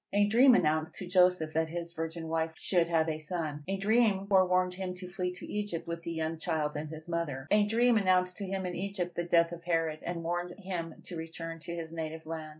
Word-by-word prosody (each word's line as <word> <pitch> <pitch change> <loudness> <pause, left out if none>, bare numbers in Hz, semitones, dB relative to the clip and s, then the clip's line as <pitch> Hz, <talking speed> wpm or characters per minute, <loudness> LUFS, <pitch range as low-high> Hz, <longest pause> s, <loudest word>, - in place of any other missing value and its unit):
A 205 0 +5
dream 240 +5 +6
announced 155 -4 +1
to 185 - -6
Joseph 180 -3 +3
that 160 0 +1
his 170 0 -5
virgin 165 0 -4
wife 160 0 -1
should 175 -3 +2
have 165 -1 +2
a 155 -1 -2
son. 155 -2 -3
A 195 +1 -1
dream 205 -1 +3
forewarned 185 -2 +3
him 185 0 -4
to 180 0 -8
flee 180 0 -3
into 180 0 -6
Egypt 205 -5 -3
with 170 0 -4
the 170 - -5
young 160 0 -2
child 155 -2 -1
and 150 +1 -4
his 160 +1 -8
mother. 160 -5 -3
A 210 0 +5
dream 235 +2 +4
announced 185 -2 +2
to 200 - -4
him 190 0 -2
in 180 - -3
Egypt 190 -2 -3
the 175 - -1
death 170 -1 +3
of 170 -1 -8
Herod, 165 -3 0
and 170 -1 -4
warned 175 +1 -2
him 180 -5 -4
to 180 - -8
return 165 0 -6
to 170 +2 -6
his 165 -1 -6
native 160 -1 -5
land. 160 -1 -5
170 Hz, 230 wpm, -31 LUFS, 160-185 Hz, -, dream